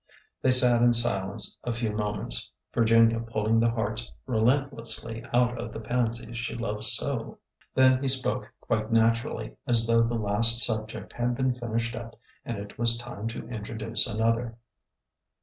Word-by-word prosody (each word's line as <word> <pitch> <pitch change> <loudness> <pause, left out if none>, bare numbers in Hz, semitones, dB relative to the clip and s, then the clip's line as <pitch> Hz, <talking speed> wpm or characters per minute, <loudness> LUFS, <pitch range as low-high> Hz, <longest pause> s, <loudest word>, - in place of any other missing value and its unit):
They 130 - +2
sat 125 -2 +5
in 120 0 +5
silence 100 -5 0
a 120 - -2
few 115 -1 -2
moments, 105 - -2
— - - -52
Virginia 115 0 +4
pulling 115 -1 0
the 115 +1 +3
hearts 110 0 -3
relentlessly 115 -2 -1
out 120 0 +2
of 115 -2 -5
the - - -7
pansies 115 0 -2
she 120 - -4
loved 105 -2 -3
so. 115 +5 0
ORDER 125 - -1
NO. 115 - -8
11 - - -11
lO - - -34 0.6
Then 130 - -4
he 140 - -1
spoke 130 0 -1
quite 110 +1 -2
naturally, 115 -1 +1
as 115 -2 +6
though 115 0 +3
the 115 +1 0
last 115 +2 +4
sub 110 -2 -1
ject - - -9
had 120 0 -1
been 130 0 +1
finished 115 -1 -3
up 115 0 -8 0.3
and 115 - -5
it 100 +1 -9
was 115 0 +3
time 120 -3 -6
to 115 - -6
introduce 110 +1 -1
another. 115 +1 -1
115 Hz, 180 wpm, -27 LUFS, 110-120 Hz, 0.6 s, as